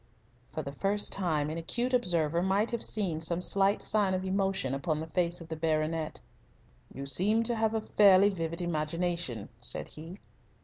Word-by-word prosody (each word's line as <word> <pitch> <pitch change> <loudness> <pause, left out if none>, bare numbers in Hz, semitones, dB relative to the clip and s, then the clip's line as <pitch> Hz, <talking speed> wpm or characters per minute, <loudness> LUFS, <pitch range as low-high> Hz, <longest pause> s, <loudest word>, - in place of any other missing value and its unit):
For 155 - -4
the 140 - -5
first 200 +8 0
time 155 -6 0
an 165 - -4
acute 240 +10 -2
observer 170 -8 +2
might 195 +5 +1
have 235 -1 -2
seen 180 -7 -2
some 170 +1 -1
slight 195 +2 +1
sign 200 -3 +1
of 185 +1 -3
emotion 190 -8 0
upon 155 +3 -1
the 160 - -4
face 170 +2 -1
of 165 - -10
the 160 - -3
baronet. 155 0 -1 0.7
"You 135 - -7
seem 200 - +3
to 235 +1 +4
have 220 -1 0
a 220 - 0
fairly 200 -2 +5
vivid 170 -2 -2
imagination," 165 - -2
said 120 - -2
he. 165 +4 -8
175 Hz, 175 wpm, -30 LUFS, 155-195 Hz, 0.7 s, fairly